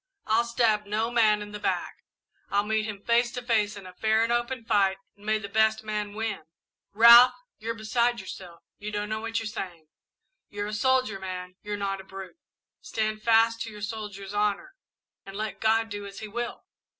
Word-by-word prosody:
I'll 225 +2 +2
stab 225 -3 +1
no 220 +3 -1
man 215 -3 +3
in 205 - -10
the 210 - -6
back - - -2 0.5
I'll 200 0 +2
meet 220 0 0
him 205 -2 -7
face 235 +1 +2
to 245 - -5
face 215 -4 +1
in 195 - -10
fair 220 0 +3
and 230 +1 +1
open 240 0 -2
fight, 195 -3 +3 0.2
and 205 +1 -16
may 215 0 +3
the 210 -2 -6
best 220 +1 +2
man 210 -1 -3
win! 220 -5 -3 0.5
"Ralph, 235 +4 +9 0.2
you're 230 +1 -3
beside 235 +2 +1
yourself 185 -2 -9 0.2
you 210 +1 -5
don't 210 0 -3
know 215 0 -2
what 225 0 -3
you're 225 - -2
saying. 175 -7 -6 0.6
You're 205 0 -4
a 210 - -5
soldier, 255 -2 +1
man, 185 -1 -6
you're 205 0 -4
not 195 -1 -2
a - - -15
brute! 190 - -10 0.4
Stand 215 - -2
fast 230 0 +4
to 230 - -3
your 210 -1 -10
soldier's 205 -2 -6
honour, 210 - 0 0.5
and 195 - -10
let 215 0 -4
God 225 0 +2
do 205 -1 -6
as 195 - -11
He 215 - -6
will! 240 +3 -5
215 Hz, 195 wpm, -27 LUFS, 205-230 Hz, 0.6 s, Ralph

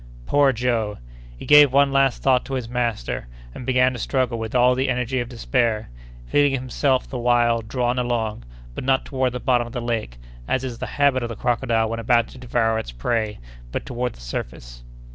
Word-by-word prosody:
Poor 145 - +4
Joe! 115 -4 -1 0.4
he - - -9
gave 145 -2 +7
one 140 +1 +4
last 135 -2 +2
thought 130 -2 +3
to 135 - -4
his 125 -3 -3
master; 120 - -2 0.3
and 125 - -9
began 130 0 +3
to 125 - -6
struggle 125 0 -1
with 110 +1 -5
all 125 0 +5
the 130 +1 0
energy 125 0 -1
of 120 -1 -3
despair, 115 - -1 0.3
feeling 145 - +2
himself 130 0 0
the 130 - -5
while 120 -1 +2
drawn 125 +2 -1
along, 115 - -2 0.3
but - - -6
not 130 0 +1
toward 130 -2 -1
the 125 - -5
bottom 120 -1 +1
of 120 - -11
the 125 - -3
lake, 115 - -3 0.3
as 130 - 0
is 125 -3 -5
the - - -4
habit 140 -2 +3
of 120 - -3
the 115 - -5
crocodile 115 -1 0
when 115 +1 -4
about 115 0 +2
to 130 - -13
devour 115 -2 0
its - - -6
prey, 105 - -2 0.3
but - - -4
toward 125 0 -3
the - - -16
surface. - - -7
120 Hz, 200 wpm, -22 LUFS, 115-130 Hz, 0.4 s, gave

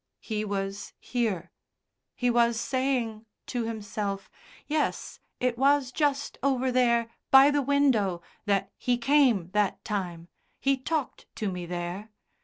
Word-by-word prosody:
He 215 -2 -2
was 200 -1 -4
here. 220 -8 -2 0.6
He 245 -1 +1
was 235 -1 +3
saying 240 -4 -1 0.2
to 245 -2 -2
himself: 210 -3 -4 0.3
"Yes, 305 0 -2 0.2
it 245 -1 0
was 275 -1 +3
just 285 -1 -1
over 260 -2 +1
there, 235 -2 +2 0.2
by 270 +2 +8
the 290 0 +2
window, 250 -11 +2 0.2
that 195 -1 +1
He 245 -1 +1
came 240 - +3
that 210 -1 0
time. 180 -6 -3 0.3
He 275 0 +2
talked 285 +1 -3
to 210 -3 -2
me 180 -1 -5
there. 175 +4 -4
235 Hz, 130 wpm, -28 LUFS, 200-265 Hz, 0.6 s, by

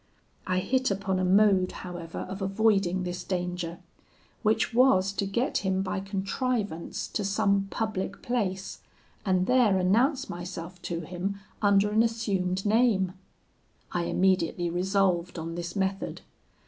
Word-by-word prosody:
I 185 0 +1
hit 260 +5 +1
upon 195 -1 -1
a - - 0
mode, 190 0 +4
however, 175 -2 -6
of 195 +1 -6
avoiding 195 -2 +2
this 180 0 -4
danger, 180 -2 -3 0.6
which 220 +1 +1
was 230 -6 +4
to 200 0 -1
get 235 +7 0
him 190 -1 0
by 195 - -2
contrivance 195 -1 -2
to 210 - -2
some 200 0 +1
public 200 -3 -3
place, 195 -6 -2 0.5
and 185 -1 +3
there 245 -5 +4
announce 245 - +2
myself 175 0 -7
to 170 -1 -2
him 185 +4 -4 0.2
under 200 0 +4
an 220 +1 +4
assumed 195 -5 0
name: 210 -4 +3 0.8
I 175 -1 -1
immediately 175 -2 +1
resolved 180 -1 +1
on 165 0 -4
this 175 0 -5
method. 195 0 -2
190 Hz, 135 wpm, -28 LUFS, 180-210 Hz, 0.8 s, mode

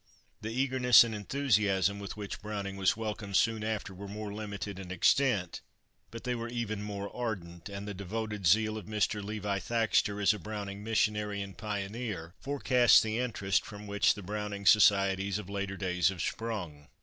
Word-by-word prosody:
The 110 - -4
eagerness 125 -1 +5
and 115 -1 -4
enthusiasm 105 -4 +1
with 100 +1 -7
which 100 -2 -6
Browning 100 -2 -4
was 95 +2 +2
welcomed 105 -3 -2
soon 110 -2 +2
after 110 -3 -3
were 100 +2 -8
more 105 0 -6
limited 100 -2 -5
in 95 -2 -8
extent, 95 +1 +2 0.5
but 115 - -9
they 125 0 -1
were 115 -1 -4
even 115 -3 -3
more 100 -1 -5
ardent, 95 -8 -5
and 100 +1 -6
the 105 - -4
devoted 105 0 -3
zeal 110 +4 +3
of 105 - -12
Mr. 105 -1 0
Levi 105 -1 -2
Thaxter 110 -1 +1
as 105 +1 +4
a 105 - -6
Browning 100 +1 -6
missionary 105 -2 0
and 100 -2 -10
pioneer 100 -4 -4
forecast 130 -4 +4
the 110 +1 -2
interest 100 -7 0
from 105 0 -9
which 100 0 +2
the 100 - -8
Browning 105 +1 -4
societies 100 -1 +4
of 100 -2 -7
later 100 -1 -3
days 90 -2 +1
have 95 -4 -4
sprung. 90 -11 -4
105 Hz, 175 wpm, -31 LUFS, 100-110 Hz, 0.5 s, eagerness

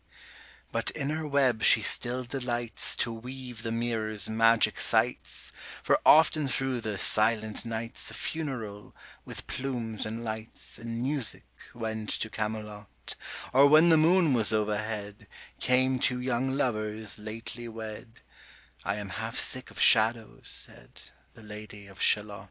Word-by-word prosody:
But - - +1
in 140 +1 -3
her 155 0 -3
web 135 -5 +1
she 110 - +6
still 125 +4 +4
delights 120 -2 0
To 115 - -1
weave 125 0 -8
the 115 - -4
mirror's 110 -3 -1
magic 115 +1 +3
sights, - - 0
65 - - -18 0.2
For - - +2
often 155 -1 +5
thro' 135 -1 -1
the 110 -3 -4
silent 110 +2 +1
nights 115 0 -4
A - - -9
funeral, 120 -10 -5 0.3
with - - -8
plumes 120 -5 -4
and 115 +2 -6
lights, 110 0 -7
And 115 +1 -5
music, 135 -3 -1 0.3
went 110 -2 -5
to 110 - 0
Camelot: 105 - -5 0.4
Or 135 +2 +7
when 155 +4 +6
the 165 - +6
moon 165 -1 +4
was 115 -4 +3
overhead, 105 -1 -3 0.3
Came 130 0 +2
two 125 0 +1
young 125 +1 -1
lovers 110 -5 -3
lately 115 +2 -6
wed; 110 +1 -9 0.6
70 - - -20
'I 100 - -1
am 105 -2 -6
half 110 +4 -5
sick 130 0 +1
of - - -12
shadows,' 110 0 +3
said - - -2 0.2
The 115 - -15
Lady 105 -1 -10
of 95 0 -13
Shalott. 105 -1 +3
115 Hz, 145 wpm, -28 LUFS, 110-130 Hz, 0.6 s, Or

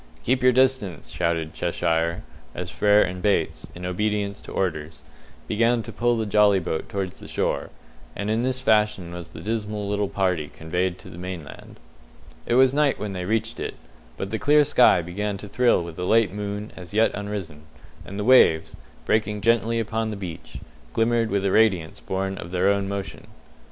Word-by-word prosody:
"Keep 130 +2 +1
your 130 0 +6
distance!" 125 - +1
shouted 80 -1 -1
Cheshire, 85 +1 -1 0.3
as - - -5
Frere 105 0 +4
and 90 0 -4
Bates, 95 -5 0
in 90 +1 -7
obedience 100 +2 -1
to - - -11
orders, 80 -4 -3 0.4
began 115 +2 +2
to - - -8
pull 120 0 +1
the 110 - -1
jolly 105 -1 +4
boat 80 - -4
towards 95 -2 -4
the - - -10
shore; - - -1 0.5
and 100 - -3
in 110 +1 +1
this 130 +1 0
fashion 105 -7 +1
was 85 -1 -8
the - - -10
dismal 105 -1 -3
little 100 -1 -1
party 90 -6 0
conveyed 90 +3 -2
to - - -13
the 85 - -10
mainland. 90 -4 -8 0.7
It 120 - +2
was 130 0 +5
night 145 -1 +2
when 100 0 -4
they 90 -1 -4
reached 110 +3 -1
it, - - -4 0.4
but 95 +7 -4
the 110 - -2
clear 150 +7 +5
sky 125 - +5
began 100 +4 -3
to 105 - -9
thrill 120 -2 +2
with 85 -1 -9
a 90 - -2
late 110 -2 +3
moon 105 +1 -4
as 90 +2 -9
yet 110 +1 +3
unrisen, 100 -7 -5 0.4
and 100 - -8
the 105 - -2
waves, 105 -10 +5 0.3
breaking 105 -1 0
gently 115 +1 +2
upon 110 0 -2
the 105 - -5
beach, 90 -5 -8 0.4
glimmered 115 0 +2
with 100 0 0
a 95 - +2
radiance 95 -8 +2
born 95 0 -3
of 85 - -7
their 90 +2 +2
own 100 -1 +1
motion. 100 -1 -6
100 Hz, 185 wpm, -24 LUFS, 90-110 Hz, 0.7 s, your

